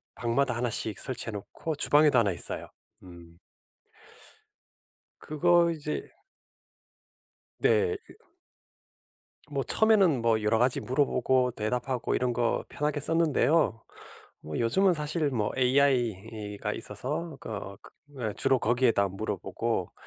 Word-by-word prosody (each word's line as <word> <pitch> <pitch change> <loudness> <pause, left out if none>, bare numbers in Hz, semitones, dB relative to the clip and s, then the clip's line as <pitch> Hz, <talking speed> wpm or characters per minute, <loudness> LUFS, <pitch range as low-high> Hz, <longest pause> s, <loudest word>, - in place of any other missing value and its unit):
방마다 125 +2 0
하나씩 115 -3 -1
설치해 125 -3 -3
놓고 105 +10 -6
주방에도 145 -2 +4
하나 105 -4 +2
있어요. 85 - -1 0.4
음. 85 -2 -14 1.8
그거 170 +2 +2
이제 150 -1 -5 1.5
네. 440 -2 +2
이 465 - -19 1.2
뭐 - - -1
처음에는 195 - +3
뭐 115 -1 +2
여러 110 +1 +2
가지 125 +1 +2
물어보고 130 -1 +1
대답하고 125 +3 -2
이런 125 -1 0
거 120 -1 0
편하게 150 0 -2
썼는데요. 160 -5 +2 0.6
뭐 75 -1 -6
요즘은 185 +11 +3
사실 150 0 -1
뭐 110 -6 -1
AI가 115 -6 0
있어서 145 +9 -5
거 100 -4 -7
그 130 -7 -8
주로 135 -1 +3
거기에다 120 -4 +2
물어보고 95 - -3
125 Hz, 240 characters per minute, -28 LUFS, 110-150 Hz, 1.8 s, 주방에도